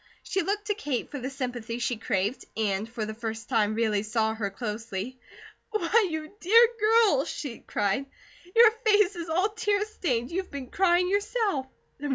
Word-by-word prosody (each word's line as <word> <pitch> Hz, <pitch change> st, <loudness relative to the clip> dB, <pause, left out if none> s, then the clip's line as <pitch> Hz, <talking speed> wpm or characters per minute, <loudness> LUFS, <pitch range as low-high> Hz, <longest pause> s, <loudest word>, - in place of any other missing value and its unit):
She 390 Hz, -, -1 dB
looked 410 Hz, +4 st, -2 dB
to 420 Hz, -, +1 dB
Kate 295 Hz, -, -3 dB
for 285 Hz, -, -4 dB
the 255 Hz, +1 st, -4 dB
sympathy 245 Hz, -4 st, -4 dB
she 245 Hz, 0 st, -1 dB
craved 205 Hz, +4 st, -1 dB
and 210 Hz, 0 st, 0 dB
for 230 Hz, -2 st, -4 dB
the 220 Hz, -, -5 dB
first 225 Hz, +1 st, -6 dB
time 215 Hz, -4 st, +2 dB
really 220 Hz, -3 st, +1 dB
saw 220 Hz, +1 st, 0 dB
her 215 Hz, -3 st, -2 dB
closely. 215 Hz, +2 st, -5 dB, 0.5 s
"Why, 430 Hz, 0 st, +2 dB
you 315 Hz, +3 st, -5 dB
dear 455 Hz, +6 st, +6 dB
girl," 430 Hz, -, +4 dB
she 280 Hz, -7 st, -5 dB
cried. 205 Hz, +7 st, -1 dB, 0.5 s
"Your 460 Hz, -1 st, +8 dB
face 415 Hz, -3 st, +4 dB
is 335 Hz, -1 st, -6 dB
all 365 Hz, +6 st, +2 dB
tear 420 Hz, -1 st, 0 dB
stained. 260 Hz, -, -2 dB
You've 375 Hz, +2 st, -3 dB
been 270 Hz, -3 st, -7 dB
crying, 360 Hz, -1 st, +3 dB
yourself." 405 Hz, -, 0 dB
275 Hz, 170 wpm, -27 LUFS, -, 0.5 s, Your